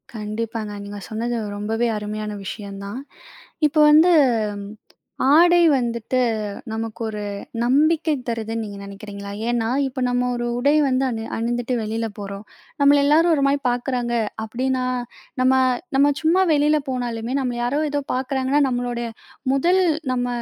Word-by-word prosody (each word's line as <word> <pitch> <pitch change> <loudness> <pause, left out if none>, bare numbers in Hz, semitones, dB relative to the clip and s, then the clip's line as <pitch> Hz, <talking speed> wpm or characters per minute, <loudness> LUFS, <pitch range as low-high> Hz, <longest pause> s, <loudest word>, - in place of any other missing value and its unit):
கண்டிப்பாங்க. 215 0 -4
நீங்க 205 0 -7
சொன்னது 235 +2 -2 0.2
ரொம்பவே 225 +3 -1
அருமையான 210 0 -4
விஷயம் 200 0 -7
தான். 205 +6 -5 0.7
இப்ப 300 - -5
வந்து 320 +4 +6 1.2
ஆடை 345 +2 +6 0.2
வந்துட்டு 235 0 -1 0.5
நமக்கு 225 0 -5
ஒரு 210 -1 -5 0.4
நம்பிக்கை 305 +5 +3
தருதுன்னு 225 -1 -3
நீங்க 205 -1 -8
நினைக்கிறீங்களா? 200 0 -8 0.2
ஏன்னா 235 -2 0 0.2
இப்ப 260 0 -5
நம்ப 245 0 +1
ஒரு 240 0 -2
உடை 280 +4 +3
வந்து 260 0 +1
அணி 225 -2 -4
அணிந்துட்டு 240 +2 -1
வெளியில 225 +1 -2
போறோம். 200 +1 -7 0.4
நம்பள 285 0 +6
எல்லாரும் 325 +4 +4
ஒரு 285 - 0
மாரி 280 +1 +2
பாக்குறாங்க 245 -1 -1 0.3
அப்டீன்னா, 255 +3 -1 0.6
நம்ப 260 +1 +4 0.4
நம்ப 285 +2 +5
சும்மா 335 +4 +3
வெளியில 300 +1 +3
போனாலுமே 240 -2 -3
நம்பள 250 -3 -2
யாரோ 260 +5 0
ஏதோ 290 0 0
பாக்குறாங்கன்னா, 265 +2 0
நம்பளோட 245 -1 -2 0.5
முதல் 350 +7 +3 0.3
நம்ப 245 -1 -1
245 Hz, 130 wpm, -22 LUFS, 220-275 Hz, 1.2 s, வந்து